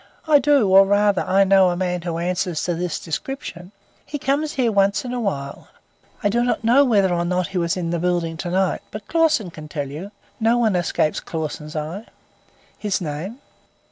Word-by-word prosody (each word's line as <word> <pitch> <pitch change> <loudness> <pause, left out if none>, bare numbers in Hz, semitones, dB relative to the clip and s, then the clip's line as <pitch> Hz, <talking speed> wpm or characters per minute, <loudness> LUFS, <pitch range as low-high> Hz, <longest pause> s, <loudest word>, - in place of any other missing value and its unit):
"I 300 -2 +6
do; 280 -5 +3
or 190 +1 +7
rather, 205 -1 +3
I 195 +1 +3
know 190 -1 +5
a 175 - -1
man 180 -1 -1
who 170 -1 -3
answers 180 -1 -1
to 175 - 0
this 175 0 -2
description. 180 - -6 0.3
He 295 - -5
comes 285 +3 -1
here 250 -4 +1
once 200 +2 +2
in 250 - -4
a 250 - -2
while. 140 -10 -4 0.6
I - - +3
do 240 +3 +1
not 245 -2 -1
know 245 +5 +5
whether 200 -8 +3
or 170 0 0
not 180 +1 -1
he 190 -2 -2
was 170 +1 0
in 170 -2 -2
the 170 - -1
building 175 -1 -1
to 175 - -4
night, 185 +1 0
but 210 -1 -9
Clausen 310 - +2
can 155 -2 -10
tell 145 -2 -4
you; 165 +8 -7 0.3
no 230 +1 +3
one 220 -5 +2
escapes 170 -3 0
Clausen's 155 -1 -5
eye." 160 +8 -5 0.7
"His 205 -2 -1
name." 170 +7 -5
190 Hz, 200 wpm, -21 LUFS, 170-220 Hz, 0.7 s, or